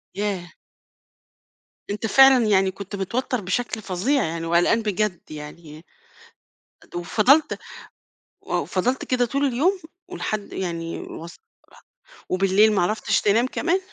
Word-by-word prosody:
ياه! 195 -4 -3 1.4
أنت 210 +2 -3
فعلًا 265 +1 +6
يعني 190 -2 +3
كنت 200 +1 -8
متوتر 240 +5 -2
بشكل 220 +4 -2
فظيع 210 +10 0
يعني 165 +1 -3
وقلقان 175 +7 +3
بجد 210 -5 -2
يعني 155 +1 -10 1.1
وفضلت 220 - +3 0.8
وفضلت 250 +8 -1
كده 250 -1 +1
طول 275 +4 -1
اليوم؟ 310 +10 +1 0.3
ولحد، 215 - -4
يعني، 170 -2 -4
وص 170 +1 -9 0.9
وبالليل 195 +3 +3
ما 190 - +2
عرفتش 215 +5 +1
تنام 225 +4 +3
كمان؟ 345 +7 0
205 Hz, 110 wpm, -23 LUFS, 175-245 Hz, 1.4 s, فعلًا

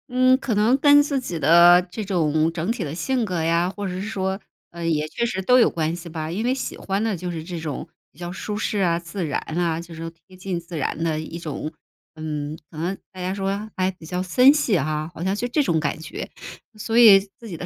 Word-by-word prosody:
嗯， 255 +1 +4
可 240 -5 -1
能 220 +5 +4
跟 290 0 +6
自 285 -2 -1
己 175 -9 -4
的 170 +4 +7
这 200 +5 -5
种 160 -5 +1
整 170 +5 -2
体 230 -5 -3
的 145 -2 -5
性 250 +8 0
格 180 -6 -2
呀， 170 +2 +2
或 200 +1 -5
者 180 - -4
是 185 - -4
说 190 -2 -2 0.3
呃， 170 0 -6
也 155 -2 0
确 235 - -2
实 190 -5 -2
都 250 +6 +5
有 235 - +5
关 160 0 -1
系 175 0 -9
吧。 155 -1 -4
因 200 +6 -2
为 250 +2 +2
喜 265 - -4
欢 195 +1 -2
的 225 -3 0
就 180 +1 -5
是 160 -2 -5
这 170 0 -6
种 155 -4 -5 0.2
比 140 - -23
较 175 0 -5
舒 205 +3 -5
适 210 0 -1
啊、 170 -3 +2
自 175 +1 -5
然 150 - -1 0.2
啊 170 -2 0
就 170 0 -9
是 160 - -9
说 165 - -4 0.2
贴 185 - -16
近 185 -1 -4
自 170 0 -8
然 150 +2 -2
的 160 -2 0
一 160 +2 -7
种 155 -1 -5 0.4
嗯， 155 -1 -4
可 155 - -13
能 175 +5 -2 0.2
大 185 - -8
家 185 +1 -2
说 200 +2 -3
还 185 0 +2
比 180 -3 -15
较 180 +3 -3
森 250 +10 +6
系 275 -10 +2
哈 155 +1 -2
好 165 - -5
像 190 +1 +1
就 240 +4 -2
这 290 +5 +1
种 165 -11 +1
感 145 -3 -1
觉。 160 - -7 0.5
所 225 +2 -1
以 215 -5 +9 0.2
自 230 - -10
己 185 - -6
的 170 - -6
180 Hz, 270 characters per minute, -23 LUFS, 165-210 Hz, 0.5 s, 以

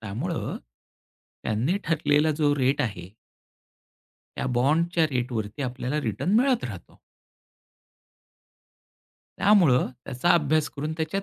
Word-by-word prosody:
त्यामुळं 120 - -4 0.9
त्यांनी 120 - 0
ठरलेला 150 -1 +2
जो 145 -2 +2
रेट 135 +1 +1
आहे 90 -7 -3 1.3
त्या - - -2
बॉन्डच्या 160 +6 +2
रेटवरती 120 -1 -3
आपल्याला 130 +3 -2
रिटर्न 115 - -2
मिळत 255 -2 +1
राहतो. - - -9 2.4
त्यामुळं 180 -12 +4 0.2
त्याचा 135 +6 -1
अभ्यास 155 -1 +2
करून 150 +2 -4
त्याच्यात 160 +5 -2
145 Hz, 95 wpm, -25 LUFS, 125-165 Hz, 2.4 s, त्यामुळं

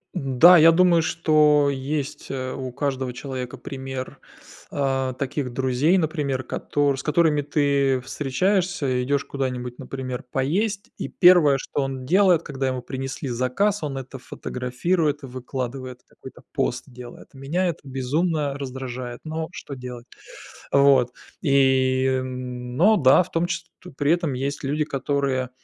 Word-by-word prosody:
Н-да, 165 +3 +6
я 165 +1 +8
думаю, 170 -1 +4
что 150 -3 +3
есть, 140 +1 -4
э, 130 -1 -3
у 130 -2 -5
каждого 130 -1 -2
человека 130 -1 -6
пример, 130 -1 -7 0.5
а, 135 -2 0
таких 135 0 -3
друзей, 135 +7 +2
например, 150 -6 -1
котор 145 +2 -1
с - - -6
которыми 155 -1 +2
ты 140 -2 +1
встречаешься, 145 0 0
идёшь 140 +2 0
куда-нибудь, 125 -3 -4
например, 130 -1 -5
поесть. 195 +10 -1
И - - -4
1, 175 -6 +6
что 140 - -3
он 135 -1 -4
делает, 180 +1 +4
когда 135 -3 -3
ему 130 -1 -2
принесли 135 +1 -5
заказ, 130 - 0
он 140 -2 -3
это 135 0 -7
фотографирует 145 +6 -2
и 135 - -6
выкладывает, 130 0 -6
какой-то - - -13
пост 125 +1 -1
делает. 125 -2 -11
Меня 145 +8 -1
это 170 - -3
безумно 140 +2 -1
раздражает, 130 -2 -6
но 160 0 -3
что 145 -5 -8
делать? 125 -2 -8 0.7
Вот. 140 -3 +5 0.3
И, 130 -2 +3
м, 125 -1 -3
но 205 +9 +5
да, 135 +4 +6
в - - -16
том 165 +1 +1
чис 170 -1 -3
то 180 - -12
при 145 +2 0
этом 170 -4 +1
есть 140 +3 -3
люди, 150 +3 0
которые, 140 -3 -1
135 Hz, 145 wpm, -23 LUFS, 130-155 Hz, 0.7 s, я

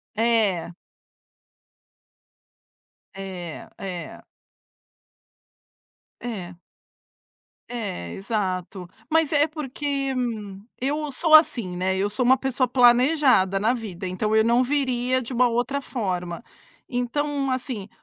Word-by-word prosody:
É. 215 -7 +1 2.4
É, 185 -4 -7
é. 185 -3 -6 2.0
É. 190 -7 -6 1.1
É, 200 - -5
exato. 190 -3 -3 0.2
Mas 320 -1 +2
é 295 +1 +4
porque, 280 -2 -3 0.7
eu 295 +3 -1
sou 315 +4 +2
assim, 235 - +5
né, 190 +1 0
eu 200 +2 0
sou 245 +4 0
uma 260 +2 +6
pessoa 260 -2 0
planejada 245 - +4
na 220 +4 +2
vida, 195 -7 -5
então 210 +4 -1
eu 220 - +5
não 235 +2 +4
viria 255 -2 0
de 240 - -7
uma 245 0 +4
outra 245 +4 -1
forma. 180 -7 -3 0.5
Então 275 +3 -1
assim, 250 -6 -3
240 Hz, 100 wpm, -24 LUFS, 190-265 Hz, 2.4 s, uma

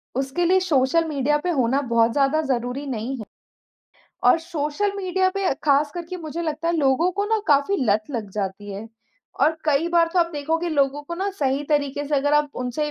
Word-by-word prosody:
उसके 270 +6 -1
लिए 375 +2 +4
social 330 -2 +2
media 295 -1 +1
पे 360 - -1
होना 265 -2 +1
बहुत 230 0 +3
ज़्यादा 280 +4 +2
ज़रूरी 260 -1 -2
नहीं 255 +1 -3
है। 220 - -7 1.0
और - - +6
सोशल 330 +4 -2
मीडिया 375 -1 +1
पे 395 +1 -3
अ, - - +2
ख़ास 290 0 +3
करके 350 +1 -5
मुझे 330 -1 -5
लगता 315 0 -2
है 340 - +1
लोगों 295 +4 +2
को 405 +2 -1
ना 440 +1 +1
काफ़ी 290 +5 +3
लत 215 -1 +2
लग 225 -7 -4
जाती 205 0 -4
है। 205 +3 -7 0.5
और 320 +1 +3
कई 305 +2 +2
बार 340 -1 +3
तो 365 - +1
आप 340 -1 +2
देखोगे 320 +4 -1
लोगों 285 -2 +1
को 340 +4 -6
ना 390 +3 -2
सही 275 0 0
तरीके 290 -1 0
से 290 +1 -1
अगर 290 +1 +1
आप 295 -1 +2
उनसे 275 +5 -2
295 Hz, 205 wpm, -23 LUFS, 265-335 Hz, 1.0 s, और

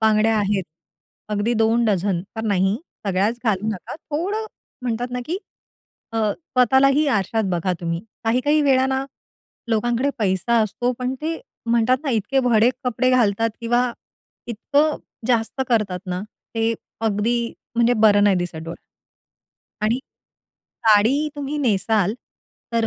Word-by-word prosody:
बांगड्या 220 0 +3
आहेत, 200 -2 0 0.7
अगदी 210 +3 0
2 225 +1 +3
डझन 195 -3 +1 0.2
तर 225 - -3
नाही. 195 -1 +2 0.3
सगळ्याच 200 +5 +1
घालू 210 -1 +1
नका. 200 -5 -5
थोडं 370 +9 -3 0.4
म्हणतात 245 0 -2
ना, 250 0 -3
की 350 +4 -2 0.7
अ, - - -3 0.2
स्वतःलाही 275 0 +3
आरशात 220 -1 +1
बघा 180 +1 0
तुम्ही. 170 0 -2 0.2
काही-काही 255 +7 +2
वेळा 265 -2 +4
ना, 265 0 0 0.6
लोकांकडे 240 +4 +1
पैसा 205 +3 +1
असतो, 240 +4 -1
पण 250 +1 -2
ते 325 +4 -2 0.3
म्हणतात 235 +2 +3
ना, 275 - 0
इतके 250 +4 +1
भडक 240 -1 +4
कपडे 255 +1 +1
घालतात 225 -2 +2
किंवा 240 +1 +1 0.5
इतकं 285 +7 +1 0.3
जास्त 240 +1 0
करतात 210 -6 +1
ना, 180 0 -2 0.3
ते 225 0 +1 0.3
अगदी 225 +2 0 0.2
म्हणजे 235 +1 +4
बरं 205 -1 +6
नाही 200 -2 +4
दिसत 175 -2 -3
डोळ्याला. 165 - -7 1.0
आणि 225 +4 +2 0.9
साडी 230 +9 +4
तुम्ही 290 +1 -3
नेसाल, 210 -4 +1 0.6
तर 230 -1 +2
230 Hz, 130 wpm, -22 LUFS, 205-255 Hz, 1.0 s, बरं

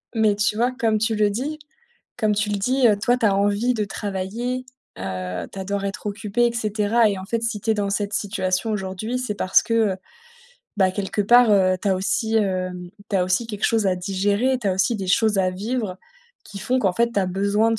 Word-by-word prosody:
Mais 215 -2 +3
tu 210 +1 +1
vois, 245 +3 +2
comme 230 -4 0
tu 220 +1 0
le 210 -1 +3
dis 280 +9 -3 0.6
comme 215 -1 +2
tu 210 0 0
le 205 - 0
dis, 255 +5 +2
heu, 210 - +3
toi 245 +4 +1
tu 230 - +2
as 195 - +3
envie 205 +5 +1
de 210 -2 -1
travailler, 205 +6 -4 0.3
heu, 90 -2 -4
tu - - -8
adores 200 +1 -3
être 200 +1 -5
occupée 210 +3 0
et 235 - 0
cetera 215 0 +2
et 195 - -3
en 190 - -8
fait, 230 +2 -2
si 225 -3 -2
tu 225 - -1
es 220 - +3
dans 205 -1 -1
cette 200 0 -2
situation 190 0 -1
aujourd'hui, 210 +4 -3
c'est 250 -5 -3
parce 185 - +3
que, 230 - -2 0.2
heu, - - -5 0.8
bah, 190 -2 +3
quelque 200 +1 -2
part, 240 +3 +6
heu, 185 -2 +4
tu 205 - 0
as 190 - +2
aussi, 205 +4 0
hem, 185 -3 -2 0.2
tu 195 - +1
as 180 - +2
aussi 185 +6 0
quelque 210 -2 -4
chose 220 -3 +1
à 185 - +1
digérer, 200 +7 0
tu 205 - -1
as - - +2
aussi 190 +5 +1
des 195 -4 -4
choses 210 +2 +3
à 185 -1 +2
vivre 205 0 -3 0.5
qui 200 - -9
font 255 +1 0
qu'en 195 -6 +1
fait, 235 +4 +1
tu 205 - 0
as 190 - 0
besoin 200 +4 +1
de 225 - -1
205 Hz, 235 wpm, -22 LUFS, 190-225 Hz, 0.8 s, part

